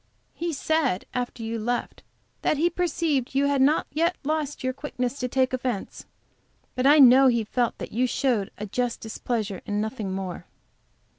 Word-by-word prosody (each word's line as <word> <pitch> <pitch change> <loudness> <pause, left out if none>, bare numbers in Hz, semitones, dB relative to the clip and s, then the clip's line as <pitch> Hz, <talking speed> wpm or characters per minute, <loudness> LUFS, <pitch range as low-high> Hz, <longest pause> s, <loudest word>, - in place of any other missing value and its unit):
He 340 0 -3
said, 290 - 0
after 245 -2 -3
you 225 0 -3
left, 240 +3 -3 0.4
that 305 - +1
he 340 +4 +2
perceived 320 -7 -1
you 275 +1 +3
had 280 -1 +2
not 290 +4 +3
yet 335 +4 +1
lost 300 -1 -2
your 255 0 0
quickness 260 -1 -4
to 250 - -1
take 260 +1 +1
offence, 250 -5 -3 0.7
but 255 +1 +1
I 295 +2 +7
know 265 -1 +8
he 235 -3 +2
felt 240 +2 -1
that - - -7
you 250 +3 +1
showed 240 -6 0
a 210 - -5
just 240 +3 -2
displeasure, 220 -3 -3
and 205 0 -1
nothing 215 -2 -3
more." 185 -2 -5
255 Hz, 170 wpm, -25 LUFS, 225-285 Hz, 0.7 s, know